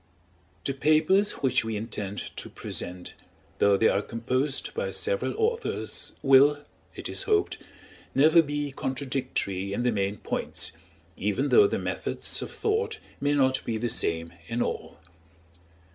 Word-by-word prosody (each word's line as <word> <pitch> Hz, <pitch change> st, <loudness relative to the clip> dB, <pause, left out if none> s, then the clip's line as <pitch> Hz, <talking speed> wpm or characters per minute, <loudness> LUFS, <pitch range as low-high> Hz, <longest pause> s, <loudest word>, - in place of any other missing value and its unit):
The 135 Hz, -, 0 dB
papers 155 Hz, +8 st, +3 dB
which 130 Hz, -1 st, +3 dB
we 110 Hz, -1 st, -3 dB
intend 105 Hz, -2 st, -5 dB
to -, -, -6 dB
present, 90 Hz, 0 st, -6 dB, 0.5 s
though 100 Hz, -1 st, +5 dB
they 110 Hz, -, +4 dB
are 100 Hz, -, +2 dB
composed 130 Hz, +6 st, -2 dB
by 485 Hz, +2 st, -2 dB
several -, -, 0 dB
authors, 460 Hz, +1 st, -1 dB
will, 140 Hz, +1 st, +6 dB, 0.4 s
it -, -, -6 dB
is -, -, 0 dB
hoped, 420 Hz, -2 st, +2 dB, 0.6 s
never 160 Hz, +5 st, +6 dB
be 145 Hz, -1 st, -3 dB
contradictory 130 Hz, -8 st, -2 dB
in 120 Hz, -, -1 dB
the 125 Hz, -, +2 dB
main 100 Hz, -1 st, -1 dB
points, -, -, -2 dB, 0.5 s
even 105 Hz, +8 st, 0 dB
though 415 Hz, -, +7 dB
the -, -, -1 dB
methods -, -, -1 dB
of -, -, -5 dB
thought 445 Hz, 0 st, -1 dB, 0.2 s
may 145 Hz, +1 st, +1 dB
not 130 Hz, -2 st, +2 dB
be 115 Hz, -, -2 dB
the 120 Hz, +2 st, -1 dB
same 85 Hz, -7 st, -1 dB
in 120 Hz, +1 st, 0 dB
all. -, -, -5 dB
130 Hz, 145 wpm, -27 LUFS, 110-155 Hz, 0.6 s, though